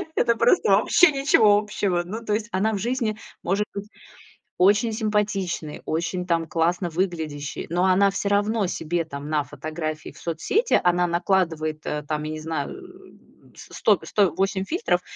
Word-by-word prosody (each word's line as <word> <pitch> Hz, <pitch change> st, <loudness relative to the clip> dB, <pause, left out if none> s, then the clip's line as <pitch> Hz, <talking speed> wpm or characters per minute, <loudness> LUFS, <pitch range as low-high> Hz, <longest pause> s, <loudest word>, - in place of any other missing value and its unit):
это 235 Hz, -, +3 dB
просто 480 Hz, -, +3 dB
вообще 355 Hz, -3 st, +5 dB
ничего 230 Hz, -7 st, +4 dB
общего. 200 Hz, -4 st, -1 dB
Ну, 220 Hz, +6 st, -6 dB
то 210 Hz, -, 0 dB
есть 215 Hz, +1 st, -1 dB
она 215 Hz, +3 st, +1 dB
в -, -, -1 dB
жизни 230 Hz, -1 st, -1 dB, 0.3 s
может 200 Hz, +3 st, 0 dB
быть 200 Hz, 0 st, -5 dB, 0.7 s
очень 205 Hz, +5 st, +3 dB
симпатичной, 210 Hz, -7 st, -2 dB
очень 170 Hz, +3 st, -2 dB
там 165 Hz, -1 st, 0 dB
классно 175 Hz, +2 st, 0 dB
выглядящей, 160 Hz, -5 st, -3 dB
но 175 Hz, +3 st, +1 dB
она 195 Hz, +2 st, +4 dB
все 200 Hz, +1 st, -2 dB
равно 205 Hz, 0 st, +1 dB
себе 170 Hz, 0 st, -2 dB
там 145 Hz, -1 st, -7 dB
на 150 Hz, -1 st, +1 dB
фотографии 155 Hz, +2 st, -5 dB
в -, -, -19 dB
соцсети, 270 Hz, -, +1 dB
она 175 Hz, 0 st, +3 dB
накладывает, 170 Hz, -3 st, 0 dB
э, 150 Hz, 0 st, -3 dB
там, 150 Hz, 0 st, -2 dB
я 155 Hz, -, -4 dB
не 155 Hz, -, -5 dB
знаю, 160 Hz, +1 st, -3 dB
э, -, -, -16 dB
с -, -, -10 dB
с -, -, -7 dB
сто -, -, +4 dB
сто 200 Hz, -4 st, +2 dB
8 195 Hz, 0 st, 0 dB
фильтров, 190 Hz, -, 0 dB
185 Hz, 170 wpm, -24 LUFS, 160-210 Hz, 0.7 s, вообще